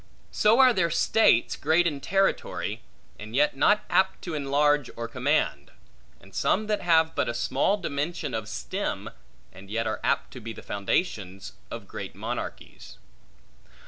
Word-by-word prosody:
So 215 +2 +4
are 260 -2 +7
there 170 -5 +1
states, 170 - +3
great 160 +4 +2
in 150 -4 -1
territory, 195 +4 0 0.4
and 110 +2 -8
yet 145 +1 +3
not 210 +9 +3
apt 190 - +1
to 175 - -5
enlarge 145 -1 +2
or 115 0 -4
command; 130 - 0 0.5
and 95 0 -18
some 215 - +1
that 210 -1 -1
have 160 -2 +3
but - - 0
a 120 - -3
small 120 - +1
dimension 150 - -3
of 110 -2 -4
stem, - - -4 0.4
and 95 +1 -13
yet 115 +2 -1 0.2
apt - - 0
to 130 - -8
be 115 -1 -7
the - - -11
foundations 100 - -2 0.2
of - - -8
great - - -7
monarchies. - - -6
145 Hz, 150 wpm, -26 LUFS, 115-175 Hz, 0.5 s, are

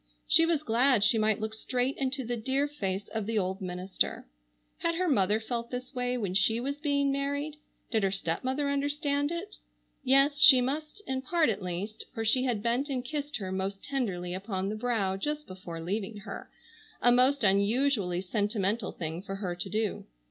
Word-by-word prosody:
She 330 - +6
was 320 -3 +1
glad 245 -2 +3
she 220 +1 +5
might 215 0 +2
look 220 0 -3
straight 250 +4 -1
into 265 -1 -1
the 240 +1 -2
dear 265 +5 0
face 200 -9 -3
of 220 -2 -3
the 225 -1 -1
old 190 0 -1
minister. 185 +1 -2 0.5
Had 335 0 0
her 365 +2 0
mother 210 - +3
felt 235 +1 -4
this 250 +2 -6
way 250 -1 -1
when 200 -6 -2
she 200 +4 +3
was 280 +4 -4
being 280 -2 +1
married? 285 +2 -2 0.3
Did 220 -3 +2
her 195 - +2
stepmother 255 - -1
understand 285 +1 0
it? 365 +5 -5 0.5
Yes, 275 +2 +4
she 265 -3 +10
must, 305 +10 -3
in 260 0 -2
part 330 +2 +2
at 205 -2 -2
least, 185 +4 -5
for 225 -1 -2
she 255 +4 +3
had 230 -5 -1
bent 245 +5 0
and 255 -2 -2
kissed 290 0 -3
her 190 -4 -5
most 190 +1 -3
tenderly 190 -11 -2
upon 190 0 -3
the 215 - -3
brow 215 -5 0
just 300 +8 -3
before 185 -3 -8
leaving 195 +5 -3
her, - - -8 0.5
a 245 - +5
most 255 +2 +4
unusually 200 -1 +2
sentimental 205 +2 -1
thing 165 0 -4
for 195 0 -6
her 190 -3 -3
to 175 +2 -4
do. 215 +1 -1
235 Hz, 185 wpm, -29 LUFS, 195-280 Hz, 0.5 s, she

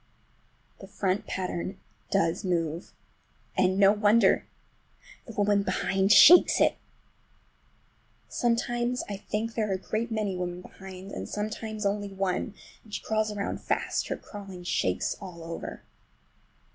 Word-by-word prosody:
The 195 - -10
front 195 0 -1
pattern 185 0 -3 0.3
does 165 +2 +1
move—and 180 +2 -3
no 195 0 +7
wonder! 210 0 +4 0.8
The 230 - -8
woman 205 -1 +2
behind 195 +1 +1
shakes 345 +10 +8
it! - - +4 1.5
Sometimes 240 +1 0
I 200 - -4
think 215 +3 -3
there 215 -2 -1
are - - +1
a - - -2
great 220 +5 -3
many 215 -4 -1
women 180 0 -4
behind, 190 +1 -10
and - - -6
sometimes 215 0 -4
only 205 0 0
one, 195 +1 -2 0.3
and 215 - -18
she - - -4
crawls 215 -1 0
around 205 -1 -3
fast, - - -1
and - - -3
her - - -25
crawling 195 -4 -9
shakes 95 - 0
it - - -17
all 175 -4 -9
over. 165 0 -7
200 Hz, 135 wpm, -28 LUFS, 185-215 Hz, 1.5 s, shakes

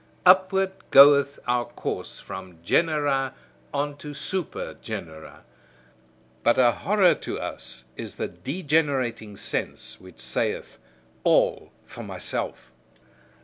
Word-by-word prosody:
Upward 190 +1 +5 0.2
goeth 140 0 +7
our 120 0 +1
course 120 - -5
from 95 -2 -9
genera 145 - +1 0.4
on 145 0 -2
to 145 0 -8
super 185 +3 -3
genera. 80 -2 -8 1.0
But 120 - +3
a 125 -2 +6
horror 190 - +3
to - - -5
us 60 0 -7
is - - -7
the - - -2
degenerating 135 - -1
sense, - - -4
which 90 -5 -15
saith: 65 0 -2 0.4
"All - - +2
for - - -10
myself." 60 - -4
140 Hz, 105 wpm, -25 LUFS, 105-155 Hz, 1.0 s, goeth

